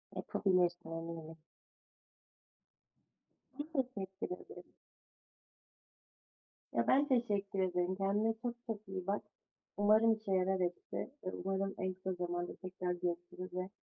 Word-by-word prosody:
Yapabilirsin 175 -3 +2
eminim. 165 -1 -5 2.2
Ben 290 0 0
teşekkür 190 -6 -5
ederim. 425 - -12 2.0
Ya, - - +4
ben 280 +2 +5
teşekkür 205 -6 +2
ederim. 180 0 +2
Kendine 205 +3 +2
çok 240 -1 -1
çok 215 -3 -4
iyi 190 -1 -4
bak. 200 +1 +1 0.6
Umarım 215 +2 +6
işe 215 -2 -4
yarar 190 0 +3
hepsi 180 +7 -2
ve 185 - -1
umarım 195 0 0
en 185 0 0
kısa 185 0 -3
zamanda 175 -1 -2
tekrar 185 -1 -3
görüşürüz 175 +1 -3
ve 185 +1 -2
190 Hz, 115 wpm, -36 LUFS, 180-210 Hz, 2.2 s, Umarım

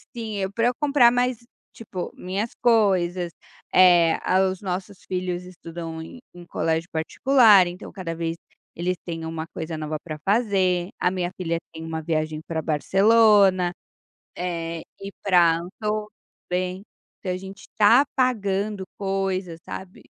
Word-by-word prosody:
Sim, 215 -4 -3
para 230 +3 +1
eu 250 - +2
comprar 280 -5 +5
mais 245 0 +1 0.4
tipo 190 -5 -6
minhas 195 +5 -3
coisas, 185 -6 +2 0.4
eh, 175 -3 +6 0.3
os 185 -1 -6
nossos 185 0 -5
filhos 180 -1 -3
estudam 165 -2 -8
em 245 +10 -10
em 175 0 -12
colégio 165 0 -1
particular 205 +4 +5
então 175 +3 -8
cada 170 -4 -5
vez 165 0 -2 0.4
eles 180 +2 -1
têm 165 -2 -5
uma 160 0 -4
coisa 160 -1 -6
nova 155 0 -3
para 155 -2 -6
fazer, 195 -5 +1
a 180 - +2
minha 180 -1 -2
filha 170 -3 -2 0.2
tem 160 0 -8
uma 160 0 -4
viagem 155 -1 -2
para 160 -1 -2
Barcelona, 195 +3 +4 0.7
eh, 170 -2 -3 0.4
para 175 -4 +4
Andorra 210 +4 -4 0.4
também, 180 +1 -2 0.4
então 185 - -3
a 180 - -2
gente 195 +1 -9
está 230 +6 +5
pagando 205 -5 0
coisas, 195 -3 -2
sabe? 190 -1 -9
185 Hz, 135 wpm, -24 LUFS, 170-205 Hz, 0.7 s, eh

